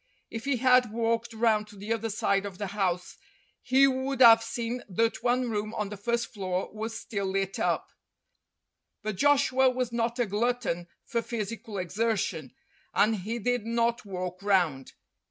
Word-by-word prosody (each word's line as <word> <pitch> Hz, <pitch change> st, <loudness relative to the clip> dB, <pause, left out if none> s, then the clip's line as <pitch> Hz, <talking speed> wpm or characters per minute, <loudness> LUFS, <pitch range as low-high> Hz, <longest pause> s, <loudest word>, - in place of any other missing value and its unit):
If 225 Hz, +2 st, -6 dB
he 275 Hz, -2 st, +1 dB
had 250 Hz, -2 st, +4 dB
walked 230 Hz, +1 st, 0 dB
round 220 Hz, -2 st, +1 dB
to 210 Hz, -, -14 dB
the 205 Hz, +3 st, -3 dB
other 225 Hz, 0 st, -3 dB
side 200 Hz, -2 st, +1 dB
of 190 Hz, -2 st, -9 dB
the 205 Hz, -, -3 dB
house 180 Hz, -3 st, -1 dB, 0.4 s
he 260 Hz, +2 st, +5 dB
would 265 Hz, 0 st, -1 dB
have 230 Hz, -2 st, +9 dB
seen 235 Hz, +1 st, -3 dB
that 225 Hz, +6 st, 0 dB
one 245 Hz, 0 st, +1 dB
room 215 Hz, +1 st, -3 dB
on 210 Hz, -2 st, -2 dB
the 210 Hz, -, -6 dB
first 235 Hz, +3 st, -2 dB
floor 185 Hz, -2 st, -3 dB
was 220 Hz, +1 st, -4 dB
still 200 Hz, -3 st, -3 dB
lit 195 Hz, 0 st, -2 dB
up; -, -, 0 dB, 1.1 s
but 215 Hz, -1 st, -2 dB
Joshua 265 Hz, +2 st, +4 dB
was 250 Hz, -1 st, -2 dB
not 235 Hz, 0 st, -1 dB
a 245 Hz, -, +2 dB
glutton 210 Hz, -5 st, -1 dB, 0.2 s
for 235 Hz, -, -1 dB
physical 225 Hz, -1 st, -5 dB
exertion, 185 Hz, -, -1 dB, 0.4 s
and 215 Hz, +1 st, +3 dB
he 215 Hz, +5 st, -4 dB
did 245 Hz, 0 st, 0 dB
not 235 Hz, 0 st, +1 dB
walk 185 Hz, -2 st, -5 dB
round. 175 Hz, -10 st, +1 dB
225 Hz, 165 wpm, -28 LUFS, 200-240 Hz, 1.1 s, have